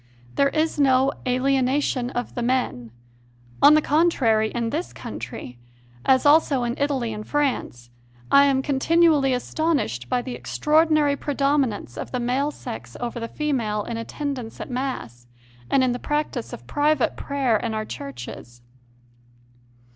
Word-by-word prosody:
There 280 0 +3
is 310 +1 -1
no 270 0 +4
"alienation 260 0 +1
of 245 -1 -4
the 245 - -3
men"; 240 - -1 0.7
on 290 +2 +8
the 310 - +3
con 320 +4 +3
trary, 220 -8 +2
in 230 -1 -2
this 330 +6 -3
country, 125 -1 -8 0.4
as 260 +1 +3
also 290 -3 +4
in 240 0 -1
Italy 270 -6 0
and 210 0 -6
France, 245 - -2 0.4
I 280 0 +7
am 270 -1 +2
continually 295 0 +3
astonished 250 - -1
by 245 - 0
the 255 - -5
extraordinary 305 +1 +2
predominance 275 - -1
of - - -5
the 250 - -2
male 255 +4 0
sex 115 - -8
over 240 0 -4
the 230 - -4
female 230 -8 -1
in 235 - -5
attendance 250 0 -5
at - - -6
Mass 185 - -4 0.4
and 265 - +3
in 255 - +2
the 245 - -3
practice 295 -5 -2
of 120 - -9
private 290 - +1
prayer 275 -5 0
in 220 +1 -3
our 215 0 -2
churches. 120 - -9
260 Hz, 145 wpm, -23 LUFS, 230-290 Hz, 0.7 s, on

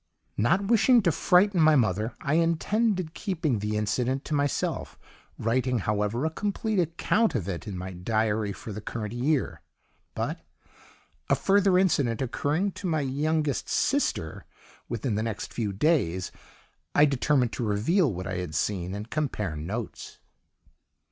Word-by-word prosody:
"Not 180 - +2
wishing 230 +2 +5
to 170 - +3
frighten 180 +3 +3
my 155 0 +6
mother, 110 -2 +1
I 140 - -1
intended 170 +2 +1
keeping 165 - -1
the 105 +1 -2
incident 125 +6 -1
to - - -4
myself, 145 -1 -1 0.4
writing, 125 +2 0
however, 105 - -1
a 160 - 0
complete 205 +3 -1
account 180 - +1
of 100 -7 -2
it 95 +2 -5
in 100 -3 -5
my 95 +1 -5
diary 110 +2 0
for 105 +2 -8
the 105 - -6
current 110 0 -5
year, 135 +4 0 0.5
but, - - -2 0.9
a - - +5
further 195 -1 +3
incident 140 - +2
occurring 145 +9 0
to 190 - -6
my 160 -3 +1
youngest 145 +1 -1
sister - - 0 0.4
within 120 0 -2
the 105 - 0
next 110 -2 -4
few 110 -4 -2
days, 95 - +1 0.6
I 145 - +7
determined 135 -3 +1
to - - -3
reveal 120 - +2
what 95 -1 -5
I 95 -1 -3
had 90 -4 -4
seen 95 -1 -1
and 105 +2 -6
compare 115 - -2
notes." 100 +10 -6
130 Hz, 150 wpm, -27 LUFS, 105-165 Hz, 0.9 s, I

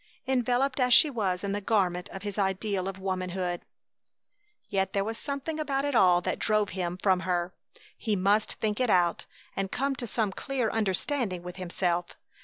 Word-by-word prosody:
enveloped 255 +1 +1
as 250 -1 +6
she 305 - +7
was 195 -7 -1
in 200 - -1
the 205 +1 -2
garment 185 -4 +1
of 190 - -8
his 205 -1 -4
ideal 195 0 0
of 195 -1 -4
womanhood. 185 -2 -2 1.1
Yet 190 -1 0
there 195 - +1
was 225 +2 -3
something 285 +2 -3
about 280 -2 0
it 285 - -1
all 180 -6 +5
that - - -2
drove 215 -2 +2
him 180 -2 -3
from 185 -1 +2
her. 180 -1 -1 0.5
He 215 -2 0
must 200 +3 +2
think 210 0 -2
it 250 -2 +2
out 175 -3 +2 0.3
and 195 -1 -2
come 275 +1 0
to 240 - -4
some 215 -2 0
clear 255 +1 -2
understanding 210 -1 -1
with 180 +1 -8
himself. 175 -1 -1
195 Hz, 180 wpm, -28 LUFS, 185-240 Hz, 1.1 s, she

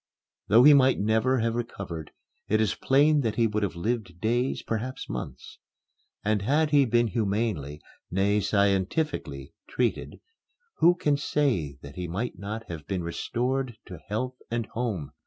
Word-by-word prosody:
Though 115 +4 +6
he 150 +2 +9
might 135 -2 +4
never 110 +4 +2
have 115 0 0
recovered, 95 -9 -5 0.4
it 110 - +2
is 110 -3 +2
plain 145 +2 +3
that 110 -4 -1
he 115 - +3
would 105 -1 0
have 100 -4 -2
lived 95 -2 -3
days, 120 +5 0
perhaps 120 +4 -4
months. - - -7 0.7
And 105 -1 +1
had 150 +8 +2
he 145 -2 +5
been 120 0 +3
humanely, 100 -9 -2 0.3
nay, 100 +3 +2
scientifically, 100 - 0 0.2
treated, 125 -2 -2 0.6
who 175 +1 +5
can 150 -4 +1
say 120 - 0
that 70 0 -11
he 90 -1 -3
might 100 +3 -4
not 105 +3 -5
have 80 -4 -8
been 95 -3 -2
restored 125 +7 -2
to 90 -3 -9
health 125 +5 -3
and 115 -1 -1
home? 105 - -3
110 Hz, 155 wpm, -27 LUFS, 95-125 Hz, 0.7 s, he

